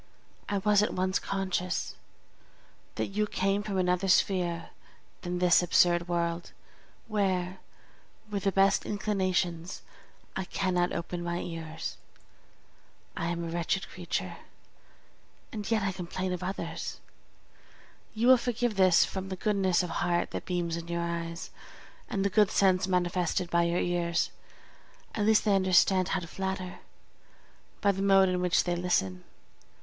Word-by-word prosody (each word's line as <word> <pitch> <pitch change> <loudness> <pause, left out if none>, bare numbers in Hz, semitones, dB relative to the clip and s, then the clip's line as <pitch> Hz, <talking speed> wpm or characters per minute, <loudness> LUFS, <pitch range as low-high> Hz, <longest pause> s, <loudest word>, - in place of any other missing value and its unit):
I 205 - 0
was 205 +1 +4
at 210 - 0
once 185 +1 +1
conscious 185 -2 -2 1.0
that - - -2
you 210 +2 0
came 195 +1 0
from 205 -2 -3
another 180 +1 +1
sphere 180 -3 +1 0.5
than 180 0 -3
this 180 0 +5
absurd 175 0 +3
world, 170 0 -2 0.5
where, 190 -3 0 0.7
with 200 -2 -4
the 195 - +3
best 195 +1 +3
inclinations, 185 -4 -1 0.5
I 190 - -2
cannot 180 -1 0
open 170 +1 -4
my 175 0 -2
ears. 165 -1 -6 1.2
I 170 - -2
am 170 0 -2
a 165 - -4
wretched 175 +2 -1
creature, 175 -2 -4 1.1
and 210 -3 -5
yet 220 -3 +2
I 195 - +1
complain 185 0 -4
of 180 - -4
others!! 185 +2 -4 1.2
You 225 +2 0
will 260 +1 +8
forgive 240 -2 -1
this 185 -2 +6
from 190 0 -5
the 190 - -3
goodness 190 -2 +1
of 175 - -4
heart 175 0 0
that - - -5
beams 175 -2 -1
in 170 0 -7
your 170 0 -2
eyes, 170 0 -4 0.6
and 195 -2 -1
the - - +3
good 210 0 +4
sense 190 -2 +3
manifested 180 -1 0
by 170 0 +3
your 170 +1 0
ears; 170 -1 0 0.8
at 210 -1 0
least 220 0 +4
they 205 -2 +4
understand 185 0 +4
how 190 - -1
to 170 - -7
flatter, 190 0 -4 1.0
by 200 - +4
the 195 0 -4
mode 195 -1 +5
in 180 0 0
which 180 0 +3
they 175 -1 -1
listen. 95 - 0
185 Hz, 145 wpm, -29 LUFS, 175-195 Hz, 1.2 s, will